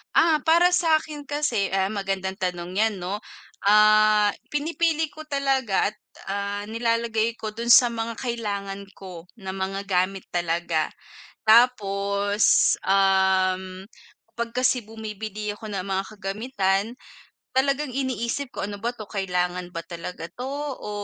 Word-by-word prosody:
Ah, 315 -3 +4
para 340 +3 +4
sa'kin 315 -3 +1
kasi, 290 -9 0
ah 190 0 +1
magandang 195 -2 -2
tanong 180 -2 -4
yan, 215 +1 +1
'no? 190 +4 -4 0.4
Ah, 215 0 +5 0.2
pinipili 320 +1 0
ko 310 - -9
talaga 265 -8 +1
at, - - -29 0.3
ah, 200 +1 -3
nilalagay 230 0 0
ko 215 -1 -5
dun 235 +2 -4
sa 240 0 +7
mga 230 0 -4
kailangan 200 -5 -4
ko 180 -3 -10
na 190 -3 -6
mga 195 +1 -3
gamit 185 0 0
talaga. 170 -2 0 0.6
Tapos, 200 -4 +4
um, 190 -1 +2 0.5
pag 235 0 -2
kasi 255 0 +2
bumibili 215 -1 -5
ako 210 - -11
ng 195 - -1
mga 195 0 -1
kagamitan 195 -1 0 0.7
talagang 275 +1 +1
iniisip 260 0 -2
ko, - - -2
"Ano 205 0 -6
ba 235 +1 -1
'to? 220 -3 -9
Kailangan 180 -2 -2
ba 165 - -3
talaga 170 0 -7
'to 250 - -6 0.3
o - - -7
205 Hz, 130 wpm, -24 LUFS, 190-235 Hz, 0.7 s, sa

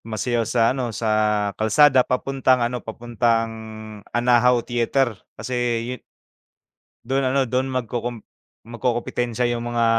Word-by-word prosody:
Sumasayaw 115 +1 -1
sa 120 - +1
ano, 130 -3 -2
sa 110 0 -3 0.4
kalsada 130 +6 +4
papuntang 130 +1 +1
ano, 120 0 -3
papuntang 115 0 -1 0.6
Anahaw 120 0 +3
Theater 120 +1 +1 0.2
kasi 130 - -5 0.3
'yo 125 0 -6 1.0
Do'n 135 +2 0
ano, 135 -3 +1
do'n 130 +2 +1
magkukum 120 -2 -3 0.4
magkukumpitensiya 120 0 -2
'yong 120 - -5
mga 115 -1 +2
120 Hz, 115 wpm, -22 LUFS, 115-130 Hz, 1.0 s, kalsada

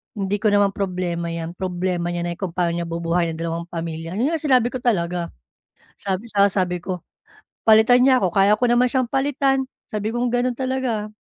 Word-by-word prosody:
Hindi 200 0 -1
ko 215 - +1
naman 205 -1 +3
problema 180 -3 -3
'yan, 165 0 -4
problema 180 -1 -2
niya 175 0 -2
na 175 - -2
yung 170 - -16
kung 180 -4 -4
paano 175 -2 +1
niya 170 0 -3
bubuhayin 170 0 -1
yung - - -9
dalawang 170 0 -3
pamilya." 165 0 -5
'yon 250 +9 +1
nga 325 - -1
sinabi 255 -5 +2
ko 255 - -4
talaga. 175 -7 0 0.7
Sabi 195 +3 -4
saka 200 -2 +3
sabi 180 -2 -1
ko, 185 -1 -4 0.7
"Palitan 225 +3 +6
niya 260 -1 +4
ako, 185 - +2
kaya 195 +3 +4
ko 245 - +1
naman 240 +1 +4
siyang 255 -1 0
palitan." 270 0 +1 0.2
sabi 210 0 -2
kong 240 +1 0
gano'n 245 +1 +1
talaga. 255 -5 -2
195 Hz, 200 wpm, -22 LUFS, 175-245 Hz, 0.7 s, Palitan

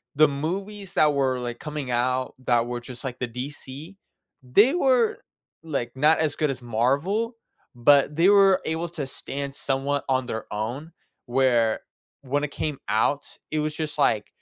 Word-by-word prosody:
the 155 +2 +6
movies 190 +7 -4
that 150 -1 +4
were, 135 -2 +1
like, 120 -1 -5
coming 150 -3 -5
out 125 +2 0
that 120 -1 +3
were 120 0 -3
just, 125 +2 -9
like, 130 -2 -5
the 125 - -1
DC, 140 +7 -7 0.5
they 205 - +4
were, 255 -9 +3 0.5
like, 140 -7 -3
not 155 +4 +4
as 155 -3 0
good 150 -2 +1
as 130 -2 -4
Marvel, 140 - 0 0.4
but 140 +4 +4
they 170 +4 +4
were 195 -2 +6
able 165 +2 -2
to 160 -4 -4
stand 140 0 -5
somewhat 140 +1 -1
on 130 -1 +1
their 110 -3 -4
own, 120 +10 -4 0.3
where 120 -3 +2 0.4
when 145 +2 -1
it 150 - -3
came 150 -2 -3
out, 125 +7 +1 0.3
it 155 - 0
was 150 0 -2
just, 155 -1 -4
like 110 -7 +2
140 Hz, 165 wpm, -25 LUFS, 125-160 Hz, 0.5 s, the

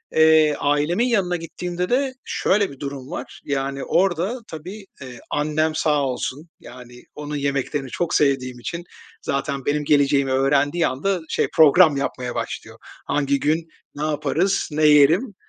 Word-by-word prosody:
Eee, 160 -1 +5
ailemin 150 +10 +1
yanına 195 -7 +1
gittiğimde 175 +2 -4
de 260 +1 +1
şöyle 200 -3 +1
bir 135 - -13
durum 140 0 -7
var. 175 - -7
Yani 135 -1 -2
orada 190 +6 0
tabii, 185 +6 -9 0.2
eee, 125 -3 -9
annem 155 +1 0
sağ 150 -2 +1
olsun, 135 +5 -4
yani, 125 -1 -13
onun 150 0 -6
yemeklerini 140 0 -2
çok 170 +6 -2
sevdiğim 130 -4 +1
için 170 +8 -5 0.4
zaten 140 -1 -3
benim 150 +1 0
geleceğimi 140 -2 +3
öğrendiği 145 +5 +2
anda 180 +9 -1
şey - - 0
program 155 0 +6
yapmaya 125 -3 -3
başlıyor. - - -5 0.3
Hangi 140 -1 0
gün 160 +3 0 0.3
ne 145 - -4
yaparız, 170 +5 0
ne 155 +1 +1
yerim, 155 - +4
150 Hz, 145 wpm, -22 LUFS, 140-175 Hz, 0.4 s, program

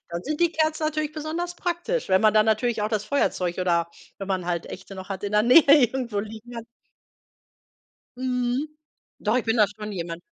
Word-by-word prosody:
Dann 170 +1 -4
sind 305 +3 -4
die 340 -1 +3
Kerzen 315 0 0
natürlich 310 -1 -1
besonders 330 +3 -4
praktisch, 355 +8 -2
wenn 190 +1 +4
man 215 -1 +4
dann 215 0 +5
natürlich 220 0 +1
auch 210 - 0
das 215 -2 -1
Feuerzeug 180 -10 0
oder, 170 -2 +1 0.3
wenn 195 0 -6
man 185 -2 -1
halt 170 -1 -2
Echte 190 +1 -9
noch 190 +1 -9
hat, 195 0 -5
in 200 - -3
der 210 0 +4
Nähe 250 +7 +7 0.2
irgendwo 235 -4 -4
liegen 220 +3 -9
hat. 230 - -6 1.5
Mhm. 255 +3 -1 0.5
Doch, 215 +3 0
ich 245 - 0
bin 225 +1 +1
da 210 - +6
schon 210 0 -8
jemand 170 -2 -5
220 Hz, 195 wpm, -24 LUFS, 195-295 Hz, 1.5 s, Nähe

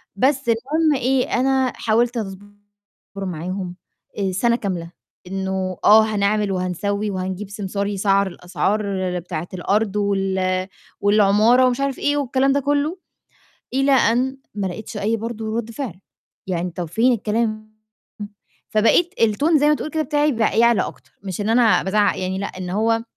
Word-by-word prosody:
بس 270 +3 +1
المُهم 285 +5 +1
إيه 255 +1 +1
أنا 265 0 +2
حاولت 235 +2 +1
أصبُر 195 -2 -5 0.7
معاهم 185 0 -4 0.4
آآ 195 -1 0
سَنة 235 +6 +2
كاملة 180 -6 -4 0.4
إنه 190 -1 -3
آه، 215 +1 +7
هنعمل 210 -1 0
وهنسوّي 200 +3 -2
وهنجيب 190 +1 -4
سمسار 200 0 -3
يسعَّر 200 -1 +1
الأسعار 190 +4 -2 0.4
بتاعة 170 -1 -5
الأرض 205 +3 0
وال 190 -2 0 0.3
والعمارة 210 +4 +4
ومش 250 0 -1
عارف 275 -2 -1
إيه 290 0 +1
والكلام 270 -1 +1
ده 285 - +2
كلّه، 290 +5 0 0.8
إلى 270 +1 +2
أن 260 +2 +2 0.2
ما 200 -2 -1
لَقيتش 205 +3 -7
أي 220 +3 0
برضه 225 0 -4
رَد 230 -1 -4
فعل 225 - -6 0.5
يعني 180 -1 -2
طَب 175 +1 -4
فين 230 +10 +2
الكلام، 215 0 -2 0.9
فبقيت 275 - +3
الtone 280 +9 +3
زي 295 - +3
ما - - +5
تقول 305 - -5
كده 315 - 0
بتاعي 300 0 +1
بقى 225 -1 +1
يعلى 235 -1 +4
أكتر، - - -9
مش 195 0 -4
إن 205 - -1
أنا 230 -1 +4
بازعّق 205 +1 +1
يعني 185 +1 -2
لأ، 200 - -2
إن 185 -1 -7
هو 225 +3 +1
215 Hz, 150 wpm, -21 LUFS, 190-245 Hz, 0.9 s, آه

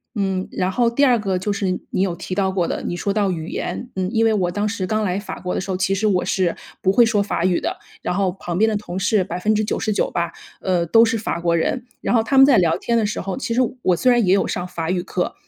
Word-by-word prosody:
嗯， 190 -2 -1
然 185 +1 -1
后 235 +2 +2
第 280 +4 +1
2 245 -3 +4
个 195 -4 -1
就 205 +2 -2
是 195 -2 -1 0.2
你 - - -1
有 180 -3 0
提 185 - -5
到 190 -1 +1
过 180 -3 0
的， - - -3
你 175 - -3
说 200 - -2
到 200 -2 +1
语 160 -1 -4
言， 245 - -4
嗯， 185 -1 -1
因 225 0 +3
为 225 - +4
我 180 -4 +1
当 205 +2 -1
时 200 -4 -3
刚 215 +2 0
来 185 -1 0
法 205 - -7
国 180 - -3
的 - - -1
时 190 0 -4
候， 185 - -1
其 190 +1 +1
实 215 - -1
我 190 -4 +2
是 185 -2 0 0.3
不 190 - +4
会 240 - +6
说 210 -3 +2
法 200 - -2
语 180 -1 +2
的， - - -3 0.3
然 - - -1
后 190 -1 +1
旁 175 -2 -5
边 220 +1 +4
的 215 - 0
同 190 -3 -5
事 195 0 +2
99% 215 +4 -1
吧， 170 0 -1 0.3
呃， 180 -3 +1
都 225 +7 +5
是 225 0 +1
法 205 -5 -3
国 170 -1 +2
人。 250 +9 -1 0.2
然 - - -1
后 225 - +4
他 265 +4 0
们 270 - +9
在 275 -4 +5
聊 170 -3 +3
天 235 - -1
的 225 - +3
时 215 - -3
候， 195 0 -3
其 245 -3 -2
实 255 - +3 0.2
我 180 - +2
虽 255 +8 +3
然 240 -2 +3
也 190 +1 +4
有 195 - +1
上 180 0 -3
法 165 0 -3
语 180 -1 0
课， 180 -1 -3
195 Hz, 295 characters per minute, -21 LUFS, 180-220 Hz, 0.3 s, 们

